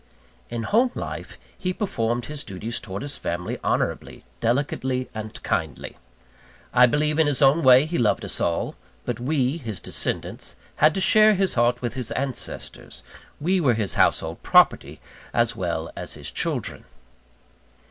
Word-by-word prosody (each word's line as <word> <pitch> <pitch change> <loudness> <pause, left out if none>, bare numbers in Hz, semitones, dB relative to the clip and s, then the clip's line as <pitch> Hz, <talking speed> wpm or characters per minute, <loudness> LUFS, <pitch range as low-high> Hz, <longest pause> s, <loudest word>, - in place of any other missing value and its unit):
In 115 -1 -4
home 235 - +3
life - - -6 0.2
he 185 0 -2
performed 120 - -1
his 150 0 -5
duties 110 +5 -4
towards 100 +1 -6
his 145 0 -5
family 90 +1 -3
honourably, - - -2 0.2
delicately, 130 +1 -1
and 110 0 -6
kindly. - - -3 0.8
I 125 0 +7
believe 150 +4 +1
in 160 - +4
his 145 -3 +1
own 140 +3 +5
way 130 0 +7
he 170 +2 -2
loved 115 -3 +1
us - - -1
all; 85 - -1 0.3
but 120 -2 -3
we, 135 +2 0
his 110 - -5
descendants, - - -1 0.2
had 155 +1 +4
to 190 - -1
share 215 +2 +5
his 195 0 +1
heart 120 +1 +1
with 120 - -2
his 125 -3 -4
ancestors 135 -1 -4 0.4
we 180 +4 +1
were 125 -7 +3
his 105 -3 -1
household - - +1
property - - +3 0.4
as 120 -1 +2
well 85 -3 -3
as - - -5
his - - -6
children. - - -2
125 Hz, 155 wpm, -24 LUFS, 115-150 Hz, 0.8 s, I